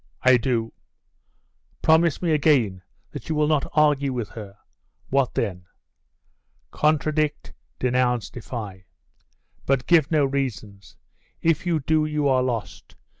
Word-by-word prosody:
'I 130 -1 +6
do.' 115 -2 -2 1.1
'Promise 160 +1 +3
me 170 - +1
again, 135 -11 +2 0.3
that - - -9
you 160 - 0
will 150 0 +2
not 150 -2 0
argue 145 -3 +2
with 120 -5 -4
her.' 105 -3 -10 0.5
'What 135 -1 +1
then?' 90 -5 -3 1.0
'Contradict, 155 0 0 0.2
denounce, 125 -2 0
defy. 105 -6 -8 0.8
But 135 -2 +1
give 160 -4 +4
no 150 -3 +3
reasons. 110 -9 -5 0.5
If 165 +1 +1
you 165 -3 +1
do, 155 +2 +1
you 150 -1 0
are 130 -2 +3
lost. 115 - -5
135 Hz, 125 wpm, -23 LUFS, 115-150 Hz, 1.1 s, I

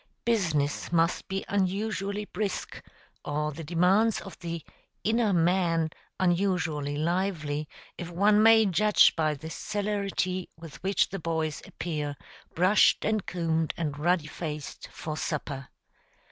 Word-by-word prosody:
Business 160 -13 0
must 165 0 +2
be 195 0 -3
unusually 200 +1 -1
brisk, 200 -1 -4 0.4
or 150 +1 -1
the 165 +3 -7
demands 180 +7 +3
of 195 - -9
the 170 -2 -5 0.4
"inner 225 -1 +2
man" 170 -2 +2 0.3
unusually 175 -6 +1
lively, 155 -3 -1 0.3
if 175 -1 -5
one 205 +4 +4
may 225 0 +7
judge 210 +3 +5
by 155 -2 +1
the 160 +3 -8
celerity 200 -3 -2
with 165 -3 -11
which 195 +2 +2
the 195 - -5
boys 160 -2 -2
appear, 150 -4 -4 0.4
brushed 185 +5 +4
and 215 -2 0
combed 165 -2 -1
and 150 -4 -3
ruddy 170 0 +2
faced, 150 -2 -6
for 155 -1 -5
supper. 140 -4 -3
175 Hz, 125 wpm, -28 LUFS, 155-195 Hz, 0.4 s, may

